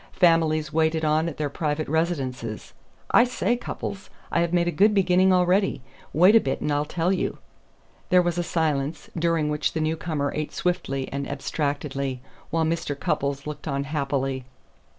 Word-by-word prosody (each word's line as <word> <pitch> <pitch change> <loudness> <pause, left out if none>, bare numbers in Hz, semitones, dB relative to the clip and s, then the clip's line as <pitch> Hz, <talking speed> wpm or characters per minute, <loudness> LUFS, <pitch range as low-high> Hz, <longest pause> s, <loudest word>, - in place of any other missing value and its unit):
Families 160 -3 +3
waited 160 0 +2
on 155 +2 +2
at 155 - -9
their 150 - -1
private 150 0 -2
residences. 135 -8 -2 0.4
I - - +7
say, 245 -1 0
Cupples, 195 -5 -6 0.2
I - - +2
have 170 0 +1
made 175 -1 +2
a - - +1
good 205 +6 +4
beginning 185 -1 +4
already. 185 -4 +2 0.3
Wait 180 +8 +6
a - - +9
bit, 135 - -2
and 150 - -1
I'll 145 +1 +1
tell 175 +4 0
you." 185 - -2 0.7
There 180 0 +5
was 175 0 -1
a - - +1
silence, 155 -3 -1
during 165 -2 +1
which 150 0 -1
the 160 - -1
newcomer 155 -2 -1
ate 155 0 -3
swiftly 170 -7 -1
and 140 0 -3
abstractedly, 140 -2 -2 0.3
while 165 0 +1
Mr. 160 -3 -2
Cupples 140 0 -1
looked 150 +1 -6
on 140 -2 -1
happily. 135 -2 -2
155 Hz, 170 wpm, -25 LUFS, 140-175 Hz, 0.7 s, a